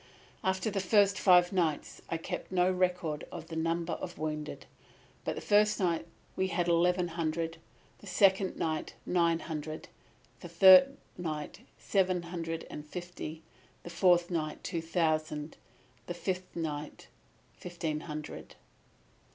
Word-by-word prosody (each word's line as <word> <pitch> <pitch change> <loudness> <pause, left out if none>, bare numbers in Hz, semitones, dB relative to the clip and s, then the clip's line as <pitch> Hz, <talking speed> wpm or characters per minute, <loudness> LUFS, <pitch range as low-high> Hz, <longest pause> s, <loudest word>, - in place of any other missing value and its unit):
"After 190 +3 0
the 200 - -1
first 200 0 +3
five 180 -1 +5
nights 165 -5 -1
I 165 - -1
kept 180 +3 -6
no 180 0 +3
record 180 -4 0
of 165 -2 -8
the 165 - -6
number 165 +1 -1
of 175 - -6
wounded; 150 -1 -4 0.6
but - - -2
the - - -5
first 210 0 +3
night 170 -3 0 0.3
we 190 - +1
had 175 -2 -1
eleven 175 +1 +3
hundred; 165 0 -2 0.4
the 205 - -13
second 190 +1 +3
night, 160 -1 -2
nine 170 -2 +2
hundred; 155 -1 -6 0.5
the 175 - -9
third 190 +11 +8 0.2
night, 155 -4 -4 0.2
seven 185 -3 +1
hundred 165 -1 -4
and 150 - -7
fifty; 165 -1 -7 0.4
the 175 - -8
fourth 175 0 +3
night, 155 -3 -3
two 170 -3 -3
thousand; 155 -2 -1 0.5
the 175 - -4
fifth 185 +1 -4
night, 150 -3 -5 0.5
fifteen 170 -3 -4
hundred. 150 -1 -7
170 Hz, 135 wpm, -31 LUFS, 160-185 Hz, 0.6 s, third